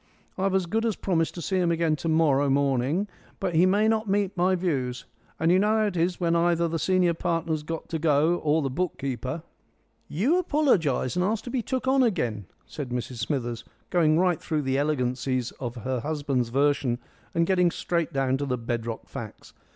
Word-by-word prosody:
I've 190 0 0
as 190 -2 +2
good 220 +6 -1
as 225 -3 0
promised 165 -4 0
to 170 - -6
see 190 - 0
him 180 -2 +2
again 165 -2 +1
to 165 - -3
morrow 145 -3 +3
morning, 140 +6 +1 0.3
but 185 -3 -2
he 170 +3 +5
may 205 +3 +3
not 220 -1 +1
meet 200 0 +1
my 185 +1 +2
views. 135 -9 -2 0.3
And 160 +1 +3
you 185 - +5
know 210 +2 +3
how 215 - +2
it 205 -3 -2
is 175 +1 0
when 170 -2 +1
either 170 0 +2
the 165 0 -2
senior 185 -1 +2
partner's 165 -2 -1
got 165 +2 -5
to 160 - -2
go 155 +2 +3
or 155 0 +1
the 135 - -2
book 180 +5 -2
keeper." 130 +3 -4 0.6
"You 255 - +1
apologise 215 - +1
and 180 - +1
ask 215 +3 0
to 245 - -7
be 260 - 0
took 260 +3 -3
on 265 0 +4
again," 120 - 0 0.2
said 145 -4 -6
Mrs 125 0 -4
Smithers, 120 0 -2 0.3
going 160 -3 +3
right 180 -1 +2
through 155 -3 -1
the 135 0 0
elegancies 130 -3 -1
of 120 -2 -4
her 125 +2 -3
husband's 140 -3 -1
version 135 -1 +1 0.4
and 170 - +3
getting 180 -1 +3
straight 170 -1 -2
down 135 -2 +1
to 140 +1 -3
the 125 -1 0
bedrock 115 -1 -4
facts. - - -9
165 Hz, 200 wpm, -26 LUFS, 135-185 Hz, 0.6 s, he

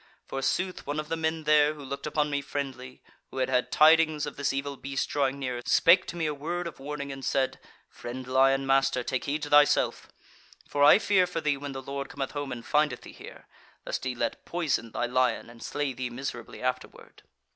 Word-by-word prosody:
Forsooth 180 +7 -2
one 145 +1 -2
of 155 0 -5
the 165 - 0
men 160 0 -2
there, 150 0 +4
who 145 -2 -10
looked 140 +2 -5
upon 150 0 0
me 145 0 0
friendly, 135 -2 -6 0.3
who - - -10
had 130 0 0
had 125 -1 +1
tidings 155 -1 +5
of - - -6
this 140 - 0
evil 140 +1 -3
beast 135 +1 -3
drawing 140 -1 0
near, 125 -3 -3
spake 175 +3 +5
to - - -6
me 165 -2 -1
a 150 - 0
word 170 +5 -4
of 170 - -7
warning, 140 0 -5
and 135 0 -8
said: 135 -1 0 0.3
'Friend 125 +2 -8
lion 135 +1 +3
master, 135 -2 +2
take 130 +1 -2
heed 150 +2 -2
to - - -4
thyself! 145 0 +4 0.6
For 145 - +1
I 145 - +9
fear 195 -4 +3
for 165 - -3
thee 150 -3 +1
when 140 0 -6
the 135 0 -6
Lord 140 0 -5
cometh 135 -2 -4
home 145 -2 -4
and 120 -1 -6
findeth 150 0 +1
thee - - -11
here; - - -12 0.4
lest - - -3
he 130 -1 -2
let 120 -1 -3
poison 155 -9 -1
thy 120 - -1
lion 125 -1 0
and 115 0 -15
slay 145 -2 -2
thee 125 0 -4
miserably 120 -2 -7
afterward.' 130 0 -5
140 Hz, 210 wpm, -28 LUFS, 130-150 Hz, 0.6 s, I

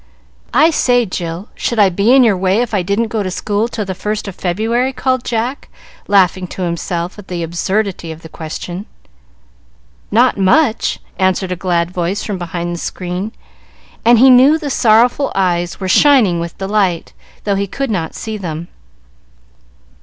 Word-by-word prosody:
"I 320 +2 +5
say, 245 -5 +2
Jill, 175 0 -5
should 235 - -3
I 205 -2 +5
be 200 +6 +2
in 265 0 +7
your 220 -4 +4
way 190 +4 +1
if 235 - -7
I 200 - +2
didn't 200 +5 -1
go 220 -1 -1
to 190 - -2
school 205 +4 -1
till 220 -3 -4
the 190 - -3
first 210 +3 -4
of 195 - -5
February?" 225 +9 -1
called 255 -1 -1
Jack, 240 +4 -3 0.4
laughing 185 -2 +3
to 185 - -6
himself 175 +2 -3
at 205 - -12
the 175 -2 -4
absurdity 175 +1 -2
of 160 +1 -10
the - - -8
question. 175 +5 -7 1.2
"Not 240 +1 +3
much!" 220 +6 +2 0.2
answered 185 0 +1
a - - 0
glad 175 -1 -1
voice 180 +2 -2
from 200 -4 -4
behind 175 0 -4
the 170 - -5
screen, 180 +5 -4 0.7
and 235 +1 +6
he 260 +3 +7
knew 265 +5 +6
the 295 -3 -4
sorrowful 240 +3 +3
eyes 175 -2 0
were 190 - -3
shining 220 - +4
with 170 0 -5
delight, 195 -3 -1 0.3
though 205 - 0
he 200 0 -1
could 270 +5 -3
not 165 -6 -3
see 220 -1 -5
them. 170 -3 -6
195 Hz, 170 wpm, -16 LUFS, 175-230 Hz, 1.2 s, in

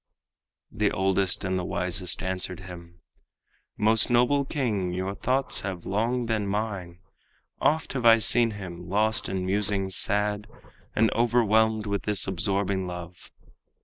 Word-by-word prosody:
The - - +1
oldest 95 +1 0
and 95 -1 -1
the - - -3
wisest 90 0 -1
answered 95 0 -3
him: 85 -2 -11 0.8
"Most 110 +1 +3
noble 125 +4 +3
king, 110 - -1
your 95 +2 -3
thoughts 130 +5 0
have 95 -3 -5
long 115 +5 0
been 110 -3 -1
mine. 100 -4 -3 0.6
Oft 160 +1 +1
have 130 -3 -3
I 115 0 +8
seen 115 +1 +4
him 90 -2 -8
lost 110 +3 +1
in 95 -1 -2
musings 95 -1 0
sad, 105 +1 +1 0.5
And 110 0 +3
overwhelmed 110 -2 +2
with 100 -1 -1
this 105 -2 0
absorbing 95 0 -1
love. 90 0 -9
100 Hz, 135 wpm, -26 LUFS, 95-110 Hz, 0.8 s, I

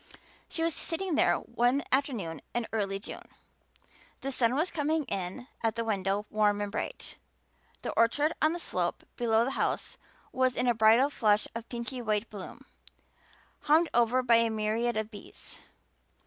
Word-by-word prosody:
She 325 - -1
was 330 -1 +1
sitting 345 +4 -2
there 305 - +4
one 245 +4 +1
afternoon 235 - -1
in 240 -1 0
early 200 -3 0
June. 200 - -9 0.9
The 275 - -3
sun 245 -1 +2
was 320 +5 0
coming 310 0 0
in 195 +3 -4
at 225 0 0
the 230 - -1
window 200 -1 0
warm 210 -1 +2
and 205 -1 -3
bright; - - -5 0.7
the - - -2
orchard 290 +7 +2
on 310 - +4
the - - -3
slope - - -2
below 230 -1 +2
the 265 - -2
house - - -2 0.3
was 255 -1 +1
in 250 - 0
a 240 - +4
bridal 230 +5 +5
flush 210 -5 +2
of 230 0 -7
pinky 240 +1 -5
white 215 -1 -1
bloom, 200 -3 -9 0.9
hummed 315 +2 +3
over 240 +2 +3
by 235 -2 +6
a 230 0 +3
myriad 220 +2 0
of 220 0 -2
bees. 205 - -11
235 Hz, 160 wpm, -29 LUFS, 215-270 Hz, 0.9 s, by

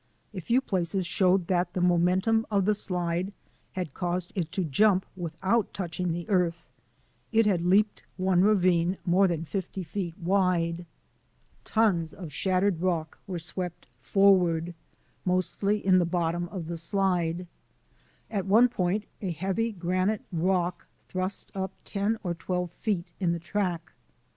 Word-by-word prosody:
A 190 - -5
few 235 +9 +2
places 185 -4 -1
showed 185 +1 +2
that 175 0 0
the - - 0
momentum 180 +6 +3
of 200 -3 +2
the 210 - +4
slide 180 -2 -1 0.4
had 180 -7 -4
caused 175 0 -2
it 170 -4 -2
to 190 - 0
jump 190 +5 +3
without 185 +6 -1
touching 180 -1 -2
the 170 +1 -4
earth. 175 -4 +1 0.7
It 225 0 +4
had 190 -5 +2
leaped 205 +3 +3 0.2
one 185 -1 +3
ravine 185 -3 +3
more 185 +3 +4
than 165 -2 -2
fifty 190 +1 -4
feet 175 0 -4
wide. 175 -2 +1 0.8
Tons 185 -8 +1
of 170 -6 -8
shattered 185 -1 +1
rock 170 -4 -1
were 185 -2 -3
swept 175 +1 -4
forward, 180 -4 +3 0.5
mostly 195 +3 0
in 185 -1 +6
the 175 - +2
bottom 175 0 -1
of 180 -4 -5
the 170 0 -5
slide. 180 -1 0 0.9
At 195 -3 -2
one 230 +5 +6
point 195 -1 -1 0.2
a 195 - -2
heavy 190 +7 -1
granite 185 +2 0
rock 180 0 0 0.2
thrust 185 +1 -3
up 190 -1 -3
ten 205 +2 0
or 175 -3 -1
twelve 180 0 -3
feet 185 -3 -2
in 175 -3 +1
the 170 - -3
track. 175 -1 -2
180 Hz, 145 wpm, -28 LUFS, 170-195 Hz, 0.9 s, in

